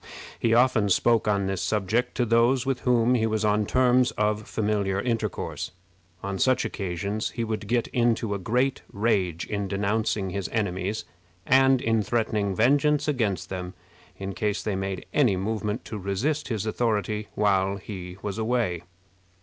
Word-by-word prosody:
He 115 0 +2
often 120 -4 +3
spoke 115 +3 +3
on 100 -2 +2
this 95 -1 -2
subject 110 +3 0
to 125 - +1
those 120 +3 +3
with 135 -2 0
whom 125 -1 +3
he 110 -3 +2
was 110 -1 0
on 105 0 +2
terms 125 -1 +3
of 105 0 0
familiar 105 -3 0
intercourse. 115 +1 -2 0.5
On 100 -1 -3
such 130 -1 +2
occasions 100 +3 -3
he 115 - -3
would 110 -2 -3
get 120 +1 +1
into 115 -3 +1
a 100 - -3
great 125 +8 0
rage 95 -6 0
in 100 -1 -3
denouncing 100 0 -1
his 100 0 -3
enemies, 100 -1 -2 0.4
and 130 0 +4
in 115 -1 +2
threatening 105 -2 0
vengeance 145 +7 +3
against 115 -10 -1
them 90 -1 -5 0.4
in 100 0 -5
case 105 +3 -1
they 105 - -1
made 95 -1 -3
any 120 -10 +3
movement 105 +2 -2
to 105 - -6
resist 120 +11 -1
his 110 -3 -2
authority 110 -1 -1
while 100 -2 +2
he 90 -2 -8
was 105 +1 -3
away. 110 -7 0
105 Hz, 155 wpm, -26 LUFS, 100-120 Hz, 0.5 s, and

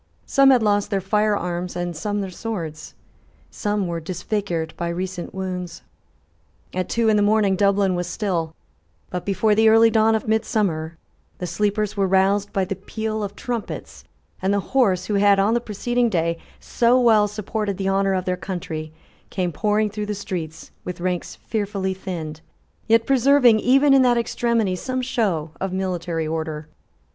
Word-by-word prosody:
Some 275 0 +5
had 255 -4 +5
lost 205 -1 +2
their 200 -2 0
fire 210 +2 +1
arms, 175 0 -4
and 175 -1 -3
some 205 +5 -2
their 190 -1 -5
swords. 170 -7 -6 0.6
Some 205 -2 -1
were 170 -1 -3
disfigured 175 -1 -3
by 170 - -3
recent 180 0 -4
wounds. 180 -2 -5 0.9
At 185 -1 -2
two 230 -1 +1
in 215 -1 +4
the - - +3
morning 205 -2 +3
Dublin 200 -1 +2
was 175 0 -2
still: 175 -5 -2 0.6
but, 180 +1 -4
before 205 +2 +2
the 220 +1 +5
early 225 +1 +6
dawn 220 0 +4
of 220 - -3
midsummer, 195 -8 0 0.4
the 180 - -4
sleepers 210 +4 -1
were 195 -1 +1
roused 195 +2 +2
by 195 -1 0
the 195 +1 -3
peal 220 +3 -4
of 200 0 -5
trumpets; 240 -3 -5 0.4
and 190 - +1
the 200 - +2
horse, 195 -9 +3
who 210 - -3
had, 200 -1 +5
on 200 +3 +3
the 240 - +1
preceding 240 +2 0
day, 170 -3 0 0.2
so 240 +2 +2
well 220 -4 +5
supported 210 -1 -3
the 195 -1 -2
honour 195 0 +2
of 185 -1 -2
their 185 - 0
country, 160 -4 -5 0.4
came 180 -2 -2
pouring 210 +4 0
through 210 0 -4
the 210 - -2
streets, 165 -5 -6
with 180 -1 -6
ranks 180 0 -3
fearfully 200 -3 -3
thinned, 165 -5 -6 0.5
yet 230 0 +4
preserving, 265 -3 +5
even 275 +5 +4
in 270 - +6
that 245 -2 +4
extremity, 230 -4 0
some 255 +6 -3
show 195 -12 -1
of 190 -1 -2
military 175 -3 -2
order. 155 -1 -4
200 Hz, 170 wpm, -22 LUFS, 180-220 Hz, 0.9 s, early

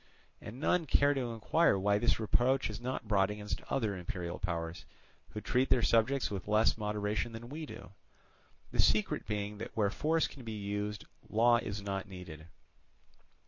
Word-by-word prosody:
And 115 +5 -8
none 165 +2 +2
care 140 +1 +4
to 125 -4 -2
inquire 115 - +3
why 100 +1 +2
this 120 0 +2
reproach 125 +3 +2
is 105 - -7
not 125 -2 -4
brought 100 -2 +3
against 105 0 -4
other 110 -7 0
imperial 90 -1 -5
powers, 85 -1 -3 0.5
who 105 - -6
treat 130 +3 +1
their 120 - +4
subjects 120 +2 +2
with 100 -2 -5
less 105 +1 +4
moderation 105 +1 -2
than 115 +1 -8
we 155 +2 -6
do; 90 - -10 0.8
the - - +3
secret 105 -1 +2
being 105 -1 -3
that 115 - -7
where 100 -2 +2
force 160 +6 +1
can 135 - -9
be 110 -1 -5
used, 105 0 -3 0.2
law 120 +2 +5
is 105 -3 -4
not 100 0 -3
needed. 85 -4 -9
105 Hz, 170 wpm, -32 LUFS, 100-120 Hz, 0.8 s, law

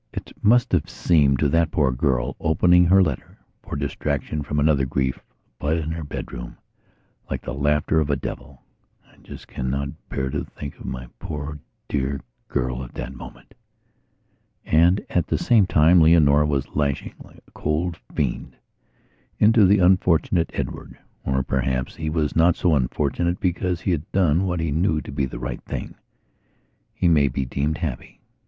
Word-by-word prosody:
It - - -7
must 120 +4 +4
have 90 -1 +1
seemed 75 -7 +3
to 70 +2 +1
that 85 +2 +2
poor 70 -4 +1
girl, 65 0 0
opening 90 +2 +4
her 95 +2 +5
letter, 75 -8 -4 0.2
for - - -7
distraction 70 +1 -2
from 75 +1 -2
another 75 -2 +3
grief, 65 0 -1 0.4
up 75 +2 +1
in 80 -1 -2
her 80 0 -4
bedroom, - - -7 0.7
like - - -4
the - - -5
laughter 75 +3 +1
of 75 -2 0
a 70 - +2
devil. 70 0 -7 0.4
I - - -25
just - - -12
cannot 70 +2 -3 0.2
bear 65 -1 -2
to - - -2
think 70 -1 -9
of - - -10
my 65 -1 -5
poor 75 0 -6 0.3
dear 70 -1 -1 0.3
girl 65 +1 -2
at - - -11
that 65 - -5
moment.... - - -12 1.1
And, 85 +5 +3
at 90 - 0
the - - 0
same 120 - +3
time, 85 +2 +5
Leonora 75 -2 +5
was 70 -3 -2
lashing, 70 -2 -1
like - - -18
a - - -23
cold 80 +3 -2 0.2
fiend, 65 -5 -2 0.8
into 110 -1 +5
the 100 +2 +5
unfortunate 90 -2 +3
Edward. - - -5 0.3
Or, 65 0 0
perhaps, 65 -1 -1
he 80 -1 -3
was 75 -2 -1
not 85 +1 +4
so 90 -3 +2
unfortunate; 75 +6 0
because 90 -1 -1
he 95 - 0
had 80 -3 -3
done 90 -1 +2
what 90 -2 -1
he 80 -2 -1
knew 80 +1 +1
to - - -9
be 70 -1 -1
the 65 - -7
right - - -5
thing, - - -6 1.0
he 90 - 0
may 75 -4 +4
be 65 0 -2
deemed 70 +5 -1
happy. 75 -8 -5
75 Hz, 170 wpm, -23 LUFS, 70-85 Hz, 1.1 s, her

